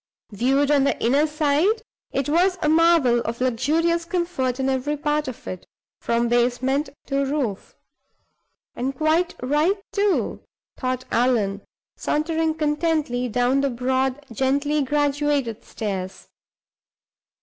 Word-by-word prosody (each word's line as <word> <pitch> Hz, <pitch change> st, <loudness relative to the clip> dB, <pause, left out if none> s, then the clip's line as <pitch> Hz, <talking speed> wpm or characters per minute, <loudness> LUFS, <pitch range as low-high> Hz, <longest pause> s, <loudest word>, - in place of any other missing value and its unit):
Viewed 270 Hz, +7 st, +2 dB
on 285 Hz, -2 st, +4 dB
the 275 Hz, -, 0 dB
inner 280 Hz, +6 st, +3 dB
side, 305 Hz, +9 st, +1 dB, 0.3 s
it 275 Hz, -, -1 dB
was 360 Hz, +5 st, +2 dB
a -, -, +2 dB
marvel 320 Hz, -6 st, +4 dB
of 235 Hz, 0 st, -4 dB
luxurious 310 Hz, +8 st, +1 dB
comfort 335 Hz, -7 st, -2 dB
in 265 Hz, -, 0 dB
every 270 Hz, +3 st, -1 dB
part 300 Hz, 0 st, -1 dB
of 255 Hz, -, -7 dB
it, 185 Hz, -, -7 dB, 0.3 s
from 235 Hz, 0 st, 0 dB
basement 250 Hz, +4 st, +1 dB, 0.2 s
to 275 Hz, 0 st, 0 dB
roof. 270 Hz, -8 st, -3 dB, 1.0 s
"And 265 Hz, +3 st, -2 dB
quite 320 Hz, +4 st, +1 dB
right, 300 Hz, +9 st, +2 dB
too," 405 Hz, -1 st, 0 dB, 0.3 s
thought 255 Hz, -1 st, -3 dB
Allan, 225 Hz, -5 st, +1 dB, 0.4 s
sauntering 320 Hz, +1 st, 0 dB
contentedly 300 Hz, -5 st, 0 dB
down 250 Hz, +4 st, +2 dB
the 280 Hz, -, +1 dB
broad, 260 Hz, +3 st, -1 dB
gently 280 Hz, +5 st, +1 dB
graduated 285 Hz, -4 st, 0 dB
stairs. 190 Hz, -3 st, -5 dB
275 Hz, 120 wpm, -23 LUFS, 250-310 Hz, 1.0 s, on